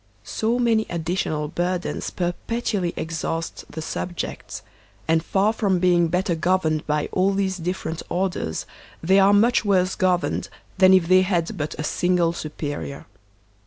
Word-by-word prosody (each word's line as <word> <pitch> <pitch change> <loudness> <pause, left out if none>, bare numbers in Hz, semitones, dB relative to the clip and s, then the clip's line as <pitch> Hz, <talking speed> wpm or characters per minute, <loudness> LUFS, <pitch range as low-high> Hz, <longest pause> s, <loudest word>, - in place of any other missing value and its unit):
So 225 +2 -1
many 230 -3 +2
additional 165 -3 -2
burdens 175 +3 -2
perpetually 185 +1 -2
exhaust 165 0 -3
the 160 - -5
subjects; 175 +2 -5 0.4
and 160 0 +2
far 200 +5 +2
from 200 -5 +1
being 175 -1 +3
better 180 +2 0
governed 165 -2 0
by 150 0 0
all 195 +1 +2
these 190 -1 0
different 170 -2 -3
or 190 +2 +1
ders, 80 - -4 0.4
they 190 +4 +5
are 195 +1 +6
much 220 +4 +4
worse 190 -3 +2
governed 185 -1 0 0.3
than 185 -1 +7
if 180 -3 +3
they 185 +1 +6
had 180 -3 0
but 150 0 -4
a 150 - -3
single 175 +1 +1
superior. 145 -3 -5
180 Hz, 145 wpm, -23 LUFS, 165-190 Hz, 0.4 s, than